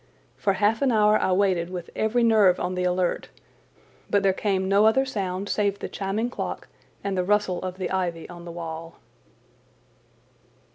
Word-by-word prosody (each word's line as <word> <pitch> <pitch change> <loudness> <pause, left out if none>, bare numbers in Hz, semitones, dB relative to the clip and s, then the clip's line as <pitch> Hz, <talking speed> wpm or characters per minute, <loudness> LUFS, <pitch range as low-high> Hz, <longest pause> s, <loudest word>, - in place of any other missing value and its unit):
For 195 - +1
half 210 +3 +1
an 270 -2 +3
hour 210 -1 +4
I - - +1
waited 185 -3 +2
with 180 -2 -7
every 235 +2 +1
nerve 215 -6 +5
on 180 - -2
the 180 0 -2
alert, 180 0 0 0.8
but 200 0 +2
there 195 -1 +4
came 190 -1 -1
no 200 +2 +5
other 265 +5 +3
sound 195 -5 -3
save 200 -1 0
the - - -5
chiming 210 +5 -2
clock - - -5 0.4
and 200 -1 -2
the 180 - +1
rustle 195 -2 +1
of 185 0 -5
the 185 -2 -3
ivy 175 -3 -2
on 175 -1 -10
the 170 - -8
wall. 165 0 -7
190 Hz, 175 wpm, -25 LUFS, 180-210 Hz, 0.8 s, nerve